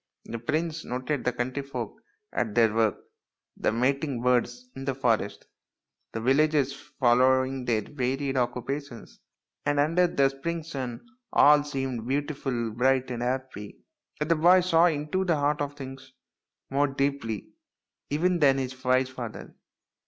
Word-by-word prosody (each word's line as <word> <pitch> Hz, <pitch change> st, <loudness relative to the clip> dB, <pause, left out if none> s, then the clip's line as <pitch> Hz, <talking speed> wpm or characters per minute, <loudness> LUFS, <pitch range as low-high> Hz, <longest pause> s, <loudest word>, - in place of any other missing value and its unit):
The 115 Hz, -, -5 dB
prince 160 Hz, +6 st, -2 dB
noted 130 Hz, +3 st, -3 dB
the 125 Hz, -, +3 dB
country 125 Hz, +3 st, -3 dB
folk 130 Hz, -6 st, -6 dB, 0.3 s
at 110 Hz, -4 st, -1 dB
their 115 Hz, -2 st, +4 dB
work, 110 Hz, -2 st, +2 dB, 0.6 s
the -, -, 0 dB
mating 130 Hz, +2 st, 0 dB
birds 125 Hz, 0 st, +1 dB
in 135 Hz, -, -6 dB
the 135 Hz, -1 st, -2 dB
forest, 115 Hz, -6 st, 0 dB, 0.7 s
the 115 Hz, -, -4 dB
villagers 140 Hz, +3 st, +2 dB
following 130 Hz, -2 st, +2 dB
their 110 Hz, -3 st, +1 dB
varied 135 Hz, +1 st, -2 dB
occupations, 125 Hz, 0 st, -3 dB, 0.4 s
and 145 Hz, 0 st, +1 dB
under 165 Hz, +5 st, +3 dB
the 140 Hz, -5 st, +2 dB
spring 165 Hz, +5 st, -4 dB
sun 135 Hz, -, -6 dB, 0.2 s
all 145 Hz, 0 st, +6 dB
seemed 135 Hz, -5 st, -3 dB
beautiful, 135 Hz, -4 st, -2 dB
bright, 130 Hz, +3 st, +1 dB
and 120 Hz, -1 st, -4 dB
happy. 125 Hz, -4 st, -4 dB, 0.4 s
But 150 Hz, +1 st, -2 dB
the 165 Hz, -, +5 dB
boy 175 Hz, +4 st, +6 dB
saw 175 Hz, -1 st, +4 dB
into 155 Hz, +3 st, -1 dB
the 175 Hz, -3 st, +2 dB
heart 145 Hz, 0 st, 0 dB
of 145 Hz, 0 st, -3 dB
things 135 Hz, -1 st, -9 dB, 0.6 s
more 140 Hz, +2 st, +3 dB
deeply 135 Hz, -6 st, -2 dB, 0.6 s
even 175 Hz, +4 st, +1 dB
than 135 Hz, -3 st, +5 dB
his 130 Hz, -1 st, -4 dB
wise 130 Hz, 0 st, +2 dB
father. 120 Hz, -4 st, -7 dB
135 Hz, 145 wpm, -27 LUFS, 125-145 Hz, 0.7 s, all